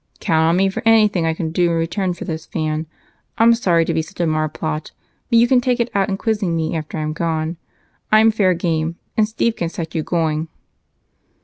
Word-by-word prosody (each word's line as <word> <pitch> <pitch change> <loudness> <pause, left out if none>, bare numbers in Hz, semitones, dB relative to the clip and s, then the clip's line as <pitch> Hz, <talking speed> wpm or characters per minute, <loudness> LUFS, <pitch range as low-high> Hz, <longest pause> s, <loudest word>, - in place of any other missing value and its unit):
"Count 160 -1 +1
on 165 +2 +3
me 195 +1 +3
for 195 +4 -3
anything 215 -6 +4
I 160 - 0
can 160 -1 -3
do 175 +1 +2
in 165 - 0
return 180 +2 -1
for - - -7
this, 160 0 -5
Van. 155 0 -2 0.5
I'm 230 +1 +6
sorry 175 -8 +2
to - - -1
be - - +1
such 175 +4 -13
a 175 - +2
marplot, 155 0 -2 0.4
but 230 - +4
you 235 +1 +5
can 250 0 +4
take 245 0 0
it 240 +1 0
out 200 0 +1
in 195 - -1
quizzing 205 -5 -1
me 160 0 -1
after 155 0 -5
I'm 155 0 -2
gone. 160 0 -2 0.5
I'm 220 +1 +6
fair 195 -4 +2
game, 165 -1 -1 0.2
and 215 -1 +3
Steve 225 +1 0
can 170 - -2
set 165 -1 -6
you 160 - -1
going." 160 -1 -1
170 Hz, 215 wpm, -19 LUFS, 160-210 Hz, 0.5 s, I'm